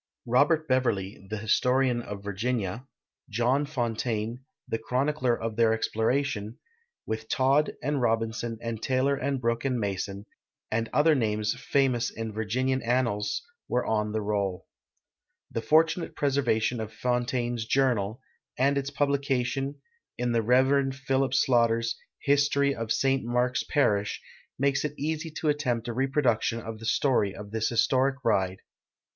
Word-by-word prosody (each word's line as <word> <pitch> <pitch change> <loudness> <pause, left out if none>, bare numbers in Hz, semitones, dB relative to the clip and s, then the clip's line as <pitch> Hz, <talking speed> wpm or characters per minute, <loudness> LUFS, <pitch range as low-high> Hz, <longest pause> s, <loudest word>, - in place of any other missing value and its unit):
Robert 150 +6 +3
Beverly, 105 -7 0
the 110 - -3
historian 125 +3 +2
of 100 -3 -7
Virginia; 110 +3 -2 0.4
.John 125 +6 +1
Fontaine, 120 -3 -2 0.2
the 115 - -2
chronicler 130 +1 0
of 115 -1 -4
their 115 -1 +4
exploration, 115 0 -1 0.5
with 110 0 -4
Todd 135 +3 +2
and 145 0 0
Robinson 115 0 0
and 115 -1 -4
Taylor 135 +2 +1
and 135 0 -1
Brooke 115 -1 0
and 130 -3 0
Mason, 100 0 -3 0.5
and 115 +1 0
other 155 +2 +4
names 105 -5 0
famous 125 -1 +1
in 110 -1 -5
Vir 110 +1 -3
ginian 130 +3 0
annals, 115 - 0 0.2
were 125 - 0
on 105 -1 0
the 110 0 -2
roll. 100 -3 -1 0.9
The 115 - -2
fortunate 160 +6 +2
preservation 130 -4 +1
of 110 -1 -5
Fontaine's 120 -1 -1
Journal, 120 -4 +1 0.4
and 140 +2 +3
its 140 0 -4
publication* 140 -1 0 0.4
in 125 0 0
the 115 -1 +2
Rev. 130 +3 +3
Philip 135 0 0
Slaughter's 115 -3 +2 0.2
" - - -64
History 140 0 +2
of 115 -3 -4
St. 135 +1 +2
Mark's 125 +1 +1
Parish," 105 -9 +1 0.4
makes 140 +1 +1
it 150 -1 -4
eas}'' 155 +2 -3
to 155 - 0
attempt 125 -6 0
a - - -2
reproduction 130 -2 +1
of 110 -1 -7
the 115 - -6
story 120 -9 +2
of 105 0 -9
this 110 0 0
historic 130 +3 +2
ride. 95 -4 +1
120 Hz, 140 wpm, -27 LUFS, 110-135 Hz, 0.9 s, their